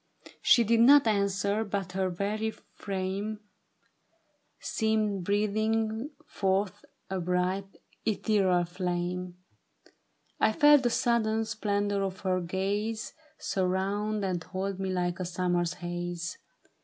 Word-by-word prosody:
" - - -15
She 240 - +6
did 230 +1 +3
not 275 +4 +7
answer, 200 0 +1
but 195 -3 -3
her 190 0 0
very 205 +5 -2
frame 200 0 -4 1.2
Seemed 215 -3 0
breathing 215 +4 0 0.2
forth 195 +1 -1 0.3
a 190 - -1
bright 180 +2 -1 0.3
ethereal 195 -5 +2
flame; 180 0 -3 1.0
I 220 - +3
felt 295 -1 +6
the 245 - +2
sudden 225 -2 +1
splendor 205 -2 -1
of 190 -1 -3
her 185 -1 0
gaze 205 +5 -2 0.2
Surround 195 +3 -1
and 180 -3 -2
hold 190 +2 -4
me 190 -1 -2
like 180 -1 -1
a 185 - -2
summer's 175 -1 0
haze. 175 -1 -5
195 Hz, 115 wpm, -29 LUFS, 180-215 Hz, 1.2 s, not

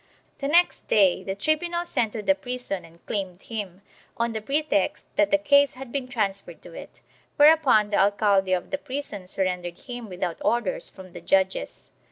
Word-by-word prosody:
The 275 - -2
next 345 +4 +3
day 195 -4 +4
the 190 0 -4
tribunal 340 - -1
sent 225 -10 -1
to 215 - -4
the 290 - +4
prison 250 -9 -5
and 165 +1 -20
claimed 190 -3 -4
him, 200 -4 -6 0.3
on 235 0 0
the 220 -1 -4
pretext 295 +7 0
that 305 - +3
the 295 - +4
case 285 -2 +4
had 260 -1 -9
been 270 -1 -3
transferred 200 -8 -3
to 175 - -12
it, - - -11 0.3
whereupon 290 -9 +5
the 205 - +2
alcaide 200 -1 +3
of - - -10
the 285 - -1
prison 265 -9 -6
surrendered 180 -2 -3
him 245 -3 -8
without 180 -2 -4
orders 235 -5 0
from 185 -2 -13
the - - -9
judges. 190 - 0
215 Hz, 180 wpm, -25 LUFS, 190-280 Hz, 0.3 s, whereupon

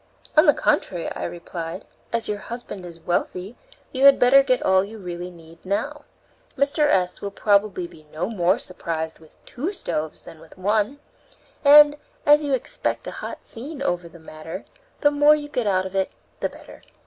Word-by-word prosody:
"On 310 - +6
the 295 - +8
contrary," 180 - 0
I - - -4
replied, 170 +1 -6 0.3
"as 230 -1 -1
your 210 -1 -2
husband 210 -6 -7
is 170 -1 -11
wealthy, 180 +5 -2 0.4
you 265 +1 +2
had 275 -1 +9
better 260 +3 +7
get 255 -2 +1
all 190 0 +4
you 215 +3 -9
really 180 -2 -6
need 165 -1 -16
now. 200 +3 -3 0.5
Mr. 280 +2 +2
S. 185 -8 +1
will 200 - -3
probably 200 -2 +1
be 155 -3 -14
no 165 +4 -2
more 185 -5 +2
surprised 160 -3 -4
with 160 -1 -19
two 295 +10 -4
stoves 155 - -4
than 165 -2 -12
with 165 +2 -16
one, 210 +7 +1 0.7
and, 295 0 +8 0.3
as 295 +1 +6
you 285 -2 -1
expect 255 - -3
a - - -5
hot - - -7
scene 275 +5 -4
over 175 -7 -1
the 165 - -14
matter, 160 +3 -9 0.4
the 290 - +5
more 290 +1 +6
you 295 -1 -5
get 250 -6 -2
out 185 -2 +2
of 190 0 -7
it 190 -1 0 0.3
the - - -1
better." - - -14
200 Hz, 185 wpm, -23 LUFS, 175-275 Hz, 0.7 s, had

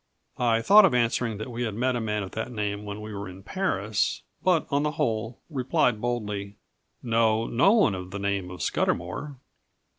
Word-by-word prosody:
I 115 -2 +2
thought 210 - +8
of 180 -10 +4
answering 115 -2 +1
that 110 +4 -6
we 120 +1 -5
had 110 -4 -2
met 125 +2 +1
a 120 - -1
man 105 -1 -1
of 95 - -8
that 110 +3 -4
name 105 -2 -3
when 105 +1 -6
we 105 0 -7
were 100 -1 -5
in 95 +1 -12
Paris; 105 - -1 0.2
but, 180 -5 +3
on 140 +1 +2
the 150 0 -1
whole, 115 -5 -1
replied 125 -6 +1
boldly: 105 -4 -3 0.5
"Know 115 -1 +2
no 145 - +4
one 210 - +4
of 90 -1 -6
the 95 - -5
name 100 -2 -2
of 90 0 -6
Scudamour." 110 - -1
110 Hz, 190 wpm, -26 LUFS, 100-125 Hz, 0.5 s, thought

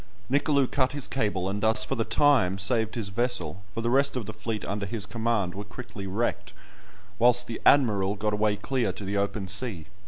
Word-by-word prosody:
Nicolou 140 0 +3
cut 130 +1 0
his 145 -2 -3
cable, 105 -7 -1
and 100 +1 -3
thus 110 +4 +3
for 135 - -3
the 115 -3 0
time 125 -10 +3
saved 110 +3 +1
his 110 -5 -2
vessel; 100 -5 -1
for 115 - -2
the 120 - -1
rest 140 +1 +2
of 125 -4 -3
the 110 - -7
fleet 105 0 -4
under 100 0 -3
his 105 0 -2
command 110 -4 -1
were 100 - -6
quickly 105 -2 -9
wrecked, 100 -2 -2 0.7
whilst 120 +1 +5
"the 115 - -6
Admiral" 105 -8 +4
got 105 +1 -2
away 105 0 +1
clear 125 -2 -1
to 100 - -8
the 100 +1 -3
open 100 0 -2
sea. 95 -3 0
110 Hz, 205 wpm, -27 LUFS, 100-125 Hz, 0.7 s, whilst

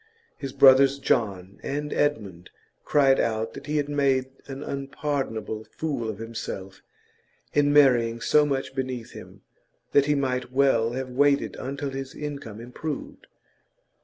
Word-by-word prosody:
His 135 -2 -6
brothers, 135 +1 +6
John 100 -8 -1
and 150 +1 -3
Edmund, 105 -12 -1 0.4
cried 135 -2 +4
out 110 0 -1
that 140 +1 -10
he 150 +1 0
had 145 -1 0
made 135 -3 +1 0.2
an 135 +1 -6
unpardonable 135 -6 -3
fool 145 -8 -3
of 105 - -5
himself 110 -4 -7 0.7
in 145 -1 +3
marrying 120 -5 +4
so 150 +6 +4
much 135 -3 -2
beneath 130 -3 -4
him; - - -12 0.5
that 140 0 +4
he 150 - +3
might 130 -2 -1
well 130 -4 +3
have 130 0 -4
waited 140 +2 +2
until 140 +1 -4
his 135 0 -6
income 140 -7 -6
improved. 125 +5 -6
135 Hz, 135 wpm, -25 LUFS, 115-145 Hz, 0.7 s, brothers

